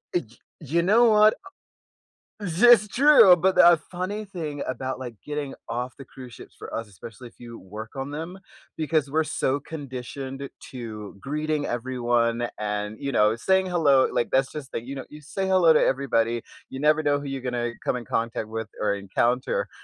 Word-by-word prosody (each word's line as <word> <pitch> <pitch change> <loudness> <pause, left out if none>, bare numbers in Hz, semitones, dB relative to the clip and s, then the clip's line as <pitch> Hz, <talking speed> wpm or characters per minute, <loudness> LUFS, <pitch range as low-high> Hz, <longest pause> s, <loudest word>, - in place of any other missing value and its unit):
Y 175 - +2 0.4
You 165 +3 0
know 215 +7 +4
what? 215 0 +6
O - - -11 1.0
This 220 +7 +6
is - - -11
true, 250 -8 +7
but 185 +2 +2
the, - - +7
uh, 175 -1 +7
funny 190 +4 -4
thing 160 -7 -6
about, 130 +1 -4
like, 125 -3 -7
getting 145 -2 -4 0.2
off 120 +2 -3
the 135 - -9
cruise 125 -2 -12
ships - - -13
for - - -9
us, 115 -1 -5
especially 115 +4 -11
if - - -29
you 115 -1 -10
work 110 +6 -10
on 135 +1 -5
them, 165 +5 -6 0.4
because 155 -2 0
we're 160 +3 +1
so 140 -2 -1
conditioned 135 -2 -7 0.2
to 110 -5 -8
greeting 150 +2 -2
everyone, 120 -1 0
and, 105 0 -3
you 140 -1 -3
know, 105 0 +3
saying 190 +7 +2
hello 150 -7 +3
like, 120 - -1
that's 135 0 +2
just 150 -4 -8
the - - -2
you 135 +2 -6
know, 135 - -6
you 150 - -12
say 190 +6 -3
hello 185 -3 +5
to 155 - +5
everybody, 120 -4 +1 0.3
you 135 - -7
never 155 +1 +4
know 145 -1 +1
who - - -8
you 135 -1 -4
gonna 120 -2 -2
come - - +1
in 125 - -5
contact 115 -1 -2
with 110 0 -4
or 105 -1 +1
encounter, 120 +6 -1
135 Hz, 190 wpm, -25 LUFS, 120-160 Hz, 1.0 s, true